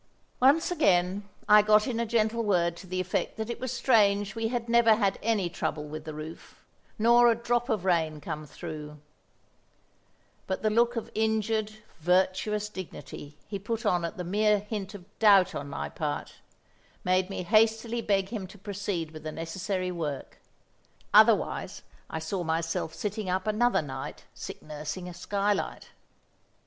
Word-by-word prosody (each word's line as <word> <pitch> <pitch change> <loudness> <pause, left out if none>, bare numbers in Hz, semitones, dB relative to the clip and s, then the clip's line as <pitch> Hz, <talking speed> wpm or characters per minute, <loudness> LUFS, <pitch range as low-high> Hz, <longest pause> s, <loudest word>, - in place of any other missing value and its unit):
Once 290 +7 +4
again 195 - +2 0.2
I 210 0 +8
got 210 0 +4
in 235 -3 -2
a 235 - 0
gentle 230 0 +1
word 175 -5 +2
to 185 - -11
the 185 +1 -3
effect 185 0 -2
that 220 +1 -3
it - - -6
was 255 -1 -3
strange 205 -6 +3
we 225 0 -1
had 240 0 -2
never 230 -1 +5
had 200 -3 0
any 215 -5 +1
trouble 155 -2 -3
with 155 +1 -7
the 155 - -6
roof, 155 +2 -9 0.4
nor 235 +2 +6
a 230 - +4
drop 240 +2 -1
of 210 -6 0
rain 160 -4 +1
come 150 +1 -6
through; 150 -1 -8 1.5
but 190 - -3
the 215 - +2
look 235 +2 +3
of 230 - -4
injured, 220 0 0 0.3
virtuous 190 +5 +1
dignity 175 -6 -9
he 200 -2 -4
put 225 +3 -4
on 180 -4 +2
at 170 - -4
the 180 - -3
mere 210 +4 +3
hint 205 -1 -5
of 185 -3 -10
doubt 200 -4 +6
on 140 0 -5
my 75 - -4
part, 75 - -4 0.7
made 185 +1 +2
me 195 - -4
hastily 225 +3 +2
beg 195 -3 +1
him 210 -5 -5
to 205 - -14
proceed 195 -5 -4
with 155 -1 -9
the 155 - -5
necessary 185 +3 -3
work—otherwise 155 -6 0 0.3
I - - -4
saw 170 +3 -3
myself 165 0 -2
sitting 210 -1 -3
up 185 +1 0
another 215 -2 +2
night 135 -2 -7
sick - - -8
nursing 155 +4 -6
a 180 - -7
skylight! 200 +3 -2
200 Hz, 160 wpm, -28 LUFS, 170-220 Hz, 1.5 s, I